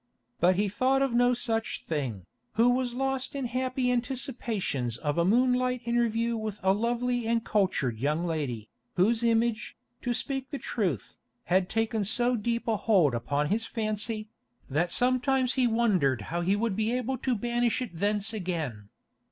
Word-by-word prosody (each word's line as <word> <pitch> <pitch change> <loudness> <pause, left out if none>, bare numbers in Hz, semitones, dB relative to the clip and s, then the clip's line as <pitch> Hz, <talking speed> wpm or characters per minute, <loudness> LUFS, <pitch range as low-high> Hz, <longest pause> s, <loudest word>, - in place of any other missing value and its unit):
But 180 +2 +4
he 205 +3 +1
thought 260 +7 +2
of 270 -3 0
no 245 +1 +4
such 225 -2 -2
thing, 130 - -3 0.3
who 235 +3 +4
was 245 -1 -1
lost 270 +1 -1
in 275 -2 -2
happy 255 +1 0
anticipations 235 - -2
of 145 +4 -1
a - - +4
moonlight 250 +4 +2
interview 235 -1 +1
with 215 -2 -4
a 190 0 +4
lovely 240 +2 0
and 230 0 +1
cultured 185 - 0
young 150 +6 0
lady, 140 -10 -3 0.3
whose 220 +6 +3
image, 230 -1 +1 0.2
to 245 - -1
speak 270 0 -3
truth, 180 - -3 0.2
had 185 +1 +1
taken 225 -1 0
so 240 +5 +2
deep 235 +2 -2
a 225 -2 +2
hold 185 - +3
upon 140 +5 -1
his 220 +4 0
fancy, 215 0 -2 0.4
that 170 +5 +1
sometimes 255 +2 +2
he 255 -2 +2
wondered 190 - +2
how 170 - 0
he 190 +3 +2
would 215 -1 -1
be 220 +2 0
able 250 +1 -1
to 255 -1 0
banish 240 +1 0
it 250 -4 -4
thence 205 +4 0
again. 160 - -4
225 Hz, 160 wpm, -28 LUFS, 180-245 Hz, 0.4 s, But